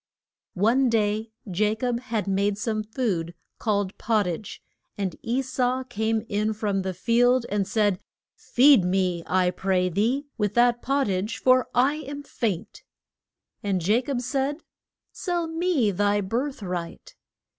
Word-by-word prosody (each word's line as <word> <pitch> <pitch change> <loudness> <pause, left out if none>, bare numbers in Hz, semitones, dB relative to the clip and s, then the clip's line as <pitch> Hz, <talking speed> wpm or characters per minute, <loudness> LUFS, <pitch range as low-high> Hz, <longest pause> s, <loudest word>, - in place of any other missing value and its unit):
One 240 +7 +3
day 215 0 0 0.2
Ja 210 +2 0
cob 240 +1 -1
had 230 -5 -3
made 200 +1 +1
some 215 0 -1
food 210 -7 -2 0.2
called 205 -3 0
pot 215 -3 +2
tage, 180 +4 -5 0.4
and 190 -4 -2
E 250 +4 -1
sau 255 0 0
came 220 -2 -1
in 210 +1 0
from 205 -2 -1
the 190 -1 -4
field 245 +5 +3
and 200 -1 0
said, 205 -3 +1 0.4
Feed 265 -4 +5
me, 180 -1 0
I 180 -1 +2
pray 185 0 0
thee, 230 - 0
with 210 -1 0
that 240 0 +4
pot 275 +1 +1
tage, 195 +3 -2
for 255 0 +4
I 270 +5 +3
am 285 -1 -7
faint. 215 -10 -3 0.8
And 190 -4 -1
Ja 220 +4 +4
cob 260 -1 -3
said, 275 +4 -2 0.5
Sell 350 -3 -2
me 325 - +1
thy 205 +2 +1
birth 240 +6 -2
right. 180 - -5
220 Hz, 145 wpm, -25 LUFS, 195-255 Hz, 0.8 s, Feed